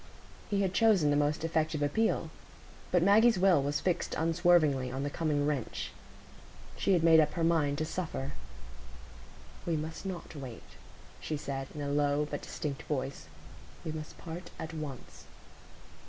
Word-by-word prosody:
He 200 -2 +1
had 190 -1 0
chosen 195 -8 +4
the - - +3
most 145 +1 +1
effective 155 -2 0
appeal; 220 +11 +1 0.6
but 180 -2 +4
Maggie's 220 +3 +6
will 180 -5 +5
was 145 +1 0
fixed 175 -2 -1
unswervingly 160 -6 +3
on 135 +2 -3
the 145 - -2
coming 150 -3 0
wrench. 145 -5 -2 0.8
She 195 - +2
had 170 -3 +3
made 165 -1 +7
up 150 -1 +3
her 170 - -1
mind 155 -4 +2
to 155 - -1
suffer. 155 -5 -4 1.3
"We 165 -2 0
must 160 +2 -5
not 185 -4 -6
wait," 130 -5 -8 0.6
she 155 - -3
said, 135 -2 -4
in 150 - -5
a 140 - -2
low 145 0 +2
but 145 - -3
distinct 140 -3 -4
voice; 135 - -3 0.6
"we 160 - -2
must 155 -1 -7
part 170 +2 -7
at 160 +1 -6
once." 150 -5 -7
155 Hz, 155 wpm, -31 LUFS, 145-175 Hz, 1.3 s, made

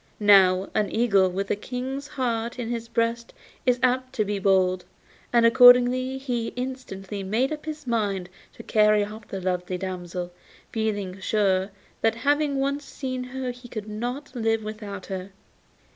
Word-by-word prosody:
Now, 195 -2 +5
an 210 -2 +1
eagle 200 -5 +3
with 195 +2 -3
a - - +2
King's 260 +6 -5
heart 240 -4 -2
in 240 -2 -4
his 230 -1 -4
breast 230 0 -1 0.3
is 250 0 +3
apt 255 +1 +1
to 215 - 0
be 205 0 -2
bold, 185 -2 +2 0.5
and 235 -1 +4
accordingly 250 +2 +6
he 245 -4 -2
instantly 245 -6 -5
made 225 +9 0
up 305 +1 -8
his 305 -1 -6
mind 205 -6 -1 0.3
to - - -11
carry 210 -1 +3
off 215 +1 -10
the 195 - -5
lovely 180 0 -2
damsel, 180 -1 -5 0.4
feeling 205 -4 -2
sure 190 -2 +1 0.3
that 225 0 +2
having 290 0 +2
once 280 +1 -1
seen 255 -2 -5
her 255 0 -4
he 245 0 -12
could 215 -3 -6
not 245 +6 -5
live 225 -2 0
without 210 -3 -7
her. 190 0 -6
225 Hz, 160 wpm, -25 LUFS, 195-250 Hz, 0.5 s, accordingly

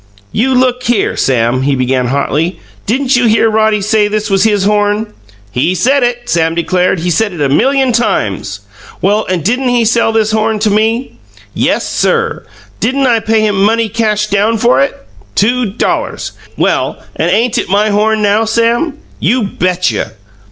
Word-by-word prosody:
"You 260 +4 +1
look 250 0 +1
here, 240 -4 +1
Sam," 125 -1 +1
he 140 +1 +1
began 130 -1 0
hotly. 145 +6 -1 0.3
"Didn't 260 +4 +1
you 245 -1 +3
hear 225 0 +3
Roddy 215 -1 +2
say 210 +1 +2
this 210 0 -2
was 195 +1 +3
his 205 -3 +2
horn?" 210 +1 0 0.4
"He 130 - 0
said 265 - +2
it!" 240 0 -1
Sam 165 -5 +1
declared. 180 +1 0
"He 175 +1 -1
said 205 +4 0
it 170 - -8
a 140 -2 +1
million 265 - +2
times!" 105 - -1 0.4
"Well, 205 +3 +1
and 180 -4 -1
didn't 250 +7 0
he 240 -2 +2
sell 230 0 +2
this 220 -1 +1
horn 220 0 0
to 215 -1 +2
me?" 225 +4 0 0.4
"Yes, - - 0
SIR!" 465 -1 -1 0.3
"Didn't 270 +4 0
I 235 -3 +3
pay 220 0 +1
him 205 -2 0
money 225 +1 +2
cash 210 -1 0
down 210 +2 +1
for 135 -10 +3
it?" 140 - -2 0.3
"Two 245 +3 +1
dollars!" 200 +4 -2 0.3
"Well, - - 0 0.2
and - - 0
ain't 240 +1 +1
it - - -4
my 210 +2 +2
horn 215 +1 +1
now, 205 +2 +2
Sam?" 235 +7 0 0.2
"You 245 +1 +1
bet 185 -2 0
you!" - - -2
215 Hz, 175 wpm, -12 LUFS, 185-235 Hz, 0.4 s, you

